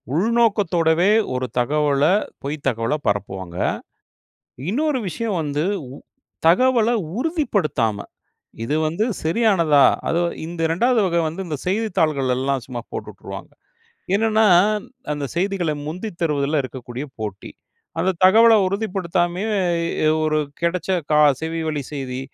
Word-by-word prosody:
உள்நோக்கத்தோடவே 195 -5 +2 0.2
ஒரு 130 0 -1
தகவல 145 +2 +1 0.4
பொய் 145 +2 -2
தகவல 115 +1 0
பரப்புவாங்க. 95 -3 -3 1.1
இன்னொரு 285 +5 0
விஷயம் 210 +3 -3
வந்து, 145 +1 -2 0.3
உ - - -9 0.5
தகவல 235 +5 +4 0.3
உறுதிப்படுத்தாம 195 - 0 0.6
இது 145 - -1
வந்து 170 +8 0 0.2
சரியானதா? 165 - +3 0.2
அது 170 - +1 0.3
இந்த 170 0 -7
2வது 240 +6 +2
வகை 170 -1 +1
வந்து 170 +5 -7
இந்த 155 -3 -3
செய்தித்தாள்கள்ல 160 - +1
எல்லாம் 135 -2 -1
சும்மா 120 -2 -5
போட்டு - - -5
உட்டுருவாங்க. - - -9 0.6
என்னன்னா, 220 +1 +3 0.7
அந்த 145 -1 -3
செய்திகள 180 -3 0
முந்தித் 180 +3 -6
தருவதுல 150 -1 +1
இருக்கக்கூடிய 130 +1 -7
போட்டி. 105 -3 -6 0.5
அந்த 185 +2 +2
தகவல 225 +4 +7
உறுதிப்படுத்தாமயே, 190 -1 -1 0.6
எ - - +5 0.2
ஒரு 155 0 +1 0.2
கெடைச்ச 175 +2 -1 0.2
கா 150 - +5 0.2
செவி 165 0 -3
வழி 150 -2 -2
செய்தி, 130 -2 -4
165 Hz, 115 wpm, -21 LUFS, 140-205 Hz, 1.1 s, தகவல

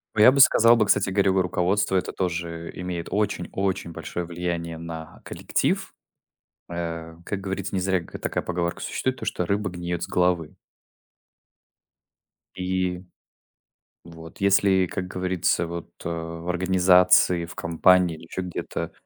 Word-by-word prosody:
О, 105 - +3
я 120 - +9
бы 140 - 0
сказал 115 -3 +7
бы, 110 -2 +3
кстати 100 -1 +2
говоря, 95 0 +2
э, 95 0 +2
руководство 95 +2 0
это 95 - 0
тоже, 85 -2 -3
э, - - -10
имеет 90 -2 -4
очень 100 -3 -1
очень 95 -3 -2
большое 85 +2 -5
влияние 85 -1 -4
на 80 -1 -8
коллектив. - - -1 0.8
Э, 85 -1 -5
как 100 +2 -4
говорится, 95 0 -4
к - - -17
не 95 - +1
зря 95 0 +1
ка - - -9
такая - - -3
поговорка 85 -1 -2
существует 130 0 -2
то, - - -6
что 90 - -1
"Рыба 100 +2 -1
гниет 85 -1 -4
с - - -4
головы". 90 -3 0 2.0
И, 90 -1 -1 1.0
вот, 80 0 -12
если, 95 -1 +4
как 90 +1 -4
говорится 90 -2 0
вот, 85 0 -6 0.2
а, 85 0 -4
в 85 - -6
организации, 90 -1 +4
в - - -11
компании 85 +1 +3
или - - -14
еще 90 - -5
где-то, 90 -1 -5
90 Hz, 155 wpm, -24 LUFS, 85-95 Hz, 2.0 s, я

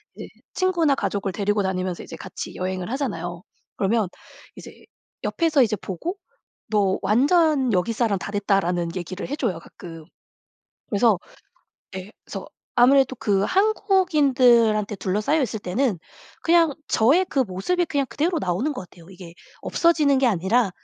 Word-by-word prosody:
이제 - - -8 0.3
친구나 345 -6 +2
가족을 200 -6 -2
데리고 205 +1 0
다니면서 185 -1 -2
이제 - - -9
같이 - - -8
여행을 185 -1 -3
하잖아요. 180 - -4 0.3
그러면 210 +1 +1 0.5
이제 - - -11 0.5
옆에서 320 -4 +2
이제 220 -2 0
보고 210 - -5 0.5
"너 200 -3 +1
완전 275 - +3
여기 185 +5 +1
사람 220 -3 0
다 200 - -6
됐다."라는 180 -4 0
얘기를 185 +1 -5
해 285 - -3
줘요, 220 - -2
가끔. 165 -1 -12 0.8
그래서 210 -2 +3 0.8
예 190 +2 -7
그래서 - - -7 0.3
아무래도 265 +2 +5
그 200 -3 +1
한국인들한테 275 - +3
둘러싸여 210 +12 0
있을 225 -4 -3
때는 200 +2 -1 0.4
그냥 335 -2 +4 0.2
저의 290 +12 +3
그 280 - 0
모습이 255 - 0
그냥 285 -4 -1
그대로 315 +8 0
나오는 200 - -1
것 190 -10 -8
같아요. 170 0 -17
이게 175 -2 -12 0.3
없어지는 305 -5 +2
게 265 - +3
아니라 205 +2 +2
220 Hz, 330 characters per minute, -23 LUFS, 190-285 Hz, 0.8 s, 아무래도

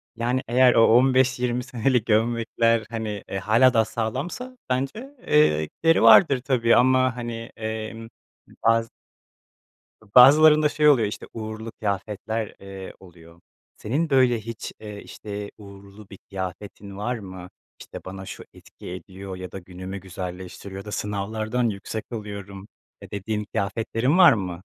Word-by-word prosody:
Yani, 120 +3 -1
eğer 125 +1 +5
o, 115 - +6
15-20 125 0 +3
senelik 125 -1 0
gömlekler, 115 0 +1
hani, 110 -3 -4
eee, 95 - -3
hâlâ 115 +6 +4
daha 110 -1 +3
sağlamsa, 155 - -4
bence, 135 - -3
eee, 115 - +4
gideri 165 - +1
vardır 140 -8 +7
tabii 125 -3 +2
ama, 130 0 +3
hani, 120 -1 -6
emm, 110 0 -5 0.6
bazı 115 0 +2 1.3
bazılarında 150 +4 +8
şey 150 0 +3
oluyor, 120 -7 +4
işte 105 - -7
uğurlu 110 0 -6
kıyafetler, 105 +1 -4
eee, 95 -1 -9
oluyor. 85 -2 -17 0.4
Senin, 150 +9 -1
böyle, 125 -4 +3
hiç, 115 0 -7
eee, 105 -1 -8
işte 105 -1 -7
uğurlu 100 0 -14
bir 100 - -11
kıyafetin 100 +1 -7
var 120 +5 -2
mı? 95 -3 -10 0.3
İşte - - -9
bana 95 +1 -8
şu - - -8
etki - - -13
ediyor 95 +2 -8
ya 90 -1 -8
da 95 - -7
günümü 95 +1 -8
güzelleştiriyor 95 +1 -8
ya - - -15
da 105 - -7
sınavlardan 110 +4 -2
yüksek 105 +2 -5
alıyorum, 100 -3 -7 0.3
eee, - - -11
dediğin 105 +1 -3
kıyafetlerin 115 - 0
var 175 -5 +8
mı? 90 -5 -4
110 Hz, 140 wpm, -24 LUFS, 100-125 Hz, 1.3 s, bazılarında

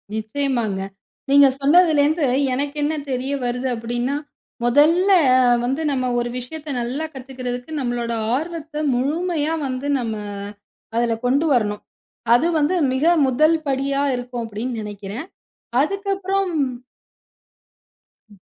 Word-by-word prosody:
நிச்சியமாங்க. 220 -3 -1 0.5
நீங்க 280 0 +7
சொன்னதுலந்து 310 0 +4 0.3
எனக்கு 285 +3 -2
என்ன 310 +2 0 0.2
தெரிய 255 +2 -2
வருது 250 +2 -1
அப்டின்னா, 240 +4 -2 0.5
முதல்ல 320 +10 +4 0.5
வந்து 265 +5 -1
நம்ம 260 -2 -1
ஒரு 240 0 -2
விஷயத்த 300 +5 -7
நல்லா 260 +7 -2
கத்துக்கிறதுக்கு 255 0 -6
நம்மளோட 240 -2 -2 0.2
ஆர்வத்த 310 0 -4
முழுமையா 310 +4 0
வந்து 260 +2 -4
நம்ம 230 -2 -2 0.8
அதுல 235 -1 +1
கொண்டு 275 +6 +2
வரணும். 210 -4 0 0.5
அது 300 +8 +4
வந்து 300 +5 +1 0.2
மிக 260 +4 0 0.2
முதல் 305 +6 +3
படியா 275 +1 0
இருக்கும் 245 -1 -5
அப்டின்னு 225 +3 -4
நெனைக்கிறேன். 210 - -7 0.5
அதுக்கப்புறம் 390 +2 -1 1.8
ம். 205 - -18
270 Hz, 105 wpm, -21 LUFS, 240-310 Hz, 1.8 s, நீங்க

